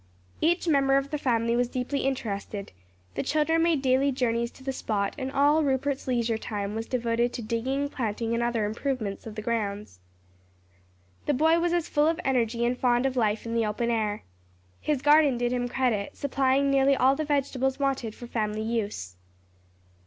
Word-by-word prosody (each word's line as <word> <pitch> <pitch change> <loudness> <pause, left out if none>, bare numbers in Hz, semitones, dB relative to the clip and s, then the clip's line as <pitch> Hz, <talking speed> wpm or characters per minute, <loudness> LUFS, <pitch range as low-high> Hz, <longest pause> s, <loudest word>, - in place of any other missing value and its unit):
Each 345 +2 +2
member 275 -3 +4
of 275 +1 -2
the 300 - -2
family 235 -3 +1
was 245 0 +1
deeply 255 +3 -2
interested; 210 -7 -3 0.4
the - - -2
children 315 +2 +1
made 330 -4 +2
daily 265 +2 +3
journeys 235 -2 0
to 265 - -15
the 270 0 -2
spot 205 -5 -1
and 260 0 -4
all 290 +3 +4
Rupert's 275 0 -1
leisure 235 -3 0
time 205 -2 -4
was 225 +1 -4
devoted 235 -1 0
to 235 - -5
digging, 260 +6 -1
planting 230 -4 -2
and 235 - 0
other 235 -2 0
improvements 220 -2 -3
of 215 - -8
the 215 - -5
grounds. 210 - -3 1.3
The 290 - +2
boy 320 +4 +4
was 345 -1 0
full 295 0 +2
of 330 +1 +1
energy 235 -2 +1
and 245 +1 +1
fond 245 0 +2
of 265 -1 0
life 220 -3 0
in 230 - -4
the 230 -2 +1
open 235 +3 -1
air. 215 -2 -1 0.6
His 295 -4 -1
garden 295 -3 +5
did 245 +1 0
him 245 -1 -1
credit, 240 -6 -1
supplying 275 0 +1
nearly 275 0 +4
all 265 +1 +4
the 310 - -2
vegetables 270 -3 0
wanted 270 -6 -1
for 240 - -9
family 215 -2 -2
use. 210 - -3
250 Hz, 180 wpm, -27 LUFS, 225-275 Hz, 1.3 s, garden